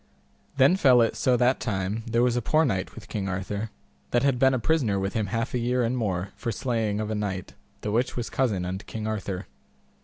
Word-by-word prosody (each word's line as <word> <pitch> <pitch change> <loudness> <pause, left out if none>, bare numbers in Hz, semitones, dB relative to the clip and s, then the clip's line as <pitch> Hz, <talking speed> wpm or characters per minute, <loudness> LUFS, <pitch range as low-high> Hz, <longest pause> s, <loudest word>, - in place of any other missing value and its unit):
Then 140 +7 +5
fell 130 -8 +6
it 115 - 0
so 125 -1 +2
that 125 +2 +3
time 100 0 -2
there 115 +1 +2
was 125 -1 +2
a 120 - +1
poor 155 +7 +3
knight 95 -8 -2
with 110 0 -10
King 100 -4 -3
Arthur, 100 +4 -3 0.4
that 120 +1 +2
had 135 -3 +2
been 130 -1 +4
prisoner 125 -8 +1
with 95 +1 -2
him 110 -2 0
half 115 +4 -2
a 125 - +1
year 125 +1 +1
and 120 +2 0
more 95 -6 -1
for 115 - -3
slaying 110 -3 -1
of 110 0 -2
a - - 0
knight, 100 -3 -3 0.3
the 105 - -2
which 120 +4 0
was 120 - -2
cousin 105 -9 0
unto 95 +2 -4
King 110 -1 -6
Arthur. 100 -4 -3
115 Hz, 220 wpm, -26 LUFS, 100-125 Hz, 0.4 s, fell